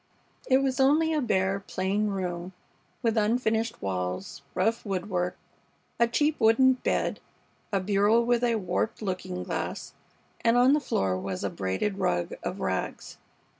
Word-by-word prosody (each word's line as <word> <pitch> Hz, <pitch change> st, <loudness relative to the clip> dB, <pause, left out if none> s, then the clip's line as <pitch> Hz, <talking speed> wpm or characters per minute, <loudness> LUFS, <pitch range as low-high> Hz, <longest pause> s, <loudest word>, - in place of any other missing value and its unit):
It 265 Hz, 0 st, +4 dB
was 265 Hz, 0 st, 0 dB
only 305 Hz, +4 st, +4 dB
a 305 Hz, -, +1 dB
bare, 195 Hz, -4 st, +1 dB
plain 195 Hz, +2 st, -1 dB
room 180 Hz, -2 st, -3 dB, 0.5 s
with 230 Hz, -1 st, +1 dB
unfinished 225 Hz, -, 0 dB
walls, 90 Hz, +3 st, -3 dB
rough 225 Hz, +5 st, +1 dB
woodwork, 180 Hz, -2 st, -2 dB, 0.6 s
a 235 Hz, -, +5 dB
cheap 295 Hz, +6 st, +1 dB
wooden 245 Hz, +4 st, +5 dB
bed, 255 Hz, -, -1 dB, 0.5 s
a 200 Hz, -, +2 dB
bureau 205 Hz, +3 st, +3 dB
with 240 Hz, 0 st, +1 dB
a 235 Hz, -1 st, +3 dB
warped 215 Hz, +3 st, -2 dB
looking 185 Hz, -, -3 dB
glass, -, -, -4 dB, 0.5 s
and 230 Hz, +1 st, +4 dB
on 250 Hz, +3 st, +6 dB
the 300 Hz, -, +4 dB
floor 95 Hz, -, 0 dB
was 95 Hz, -1 st, -4 dB
a -, -, -1 dB
braided 100 Hz, -, -2 dB
rug 85 Hz, 0 st, 0 dB
of -, -, -4 dB
rags. -, -, -3 dB
210 Hz, 145 wpm, -27 LUFS, 180-240 Hz, 0.6 s, on